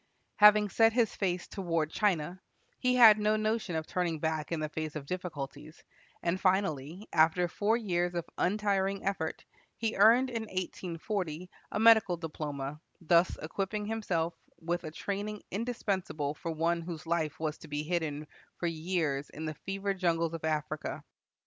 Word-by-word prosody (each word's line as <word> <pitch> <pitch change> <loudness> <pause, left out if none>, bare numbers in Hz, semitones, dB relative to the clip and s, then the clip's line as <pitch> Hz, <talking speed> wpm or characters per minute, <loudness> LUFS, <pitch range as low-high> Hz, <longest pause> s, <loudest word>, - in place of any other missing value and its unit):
Having 210 0 +7
set 225 +2 +4
his 230 -2 +2
face 180 -3 -1
toward 165 -5 -1
China, 185 -3 0 0.4
he 250 0 +2
had 225 -4 +9
no 210 +1 +2
notion 215 -4 -1
of 160 -1 -2
turning 175 -2 -1
back 155 0 -2
in 165 - -1
the 155 - -1
face 155 0 -5
of 150 -2 -5
difficulties, 155 -3 -6 0.4
and 175 +2 0
finally, 185 -1 0
after 165 +2 +4
four 210 +6 +1
years 175 -5 -1
of 170 - -2
untiring 200 0 +1
effort, 190 -5 -2 0.3
he 225 -1 -1
earned 235 +6 +6
in 230 -2 -2
1840 180 -2 -4 0.2
a - - -1
medical 220 -5 +6
diploma, 150 -3 -5 0.2
thus 170 +1 +3
equipping 200 +5 -3
himself 185 -7 -1 0.3
with 175 +1 -2
a - - -3
training 205 +5 -4
indispensable 195 -9 -2
for 165 - -6
one 165 +1 0
whose 165 -1 -7
life 160 -3 -1
was 155 -1 -2
to - - -12
be 145 0 -3
hidden 155 -3 -2 0.3
for - - -3
years 160 -4 -1
in 155 - -7
the 155 - -3
fever 195 +5 -3
jungles 170 -3 0
of 165 - -6
Africa. 155 -1 -2
175 Hz, 155 wpm, -31 LUFS, 160-205 Hz, 0.4 s, had